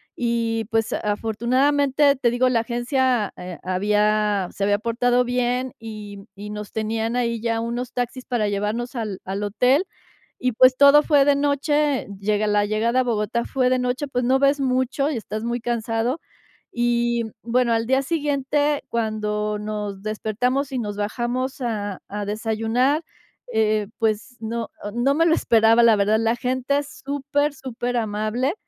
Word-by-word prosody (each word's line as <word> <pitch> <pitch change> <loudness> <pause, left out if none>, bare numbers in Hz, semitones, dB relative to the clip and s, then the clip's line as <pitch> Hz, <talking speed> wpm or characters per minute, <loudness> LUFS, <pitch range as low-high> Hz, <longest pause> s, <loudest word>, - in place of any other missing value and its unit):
y, 230 -2 -1
pues, 225 -1 +1
a - - -1
afortunadamente, 265 +7 +2
te 250 -2 +2
digo, 250 +1 +2
la 235 -2 +2
agencia, 240 -1 0
eh, 180 -1 -7
había 210 +1 +1
se 200 - -4
había 205 0 +2
portado 245 +2 +1
bien 250 +1 -1
y 210 -3 -9
y 205 +1 -8
nos 210 0 -7
tenían 225 +1 -2
ahí 235 -2 0
ya 230 -1 0
unos 240 +2 -4
taxis 245 +1 -3
para 235 -4 0
llevarnos 210 +5 -2
al 215 -5 -4
al 195 +2 -3
hotel. 250 - +2 0.6
Y, 250 -2 +1
pues, 255 +2 +5
todo 285 +2 +7
fue 285 -3 +4
de 285 0 +4
noche, 290 0 +1
llega 210 +1 0
la 205 0 +2
llegada 225 +4 +1
a - - +1
Bogotá 235 0 -1
fue 255 -2 +1
de 255 - +2
noche, 250 +3 -1
pues 250 -2 -2
no 260 +2 +3
ves 280 +1 +3
mucho 260 +2 0
y 275 - -2
estás 215 0 -5
muy 235 +1 -2
cansado. 235 +3 -1 0.5
Y, 240 0 +1
mm, 220 - -9 0.2
bueno, 245 -1 +3
al 225 0 0
día 265 +1 +3
siguiente, 290 -1 0
cuando 210 -2 -1
nos 210 -2 -4
despertamos 245 +6 -1
y 255 - -1
nos 210 -3 -4
bajamos 240 +6 -2
a 205 -5 -3
a 205 +1 -4
desayunar, 225 +7 0 0.5
eh, 215 -1 +1
pues 225 +2 -1
no 230 +1 -3 0.2
no 245 +4 +2
me 330 +2 +3
lo 325 - +4
esperaba, 225 -2 +4
la 230 -2 +6
verdad. 210 +2 +2
La 225 +1 +1
gente 255 +3 0
es 285 - -9
super, 285 +1 0
superamable, 240 -1 -2
235 Hz, 165 wpm, -23 LUFS, 215-255 Hz, 0.6 s, todo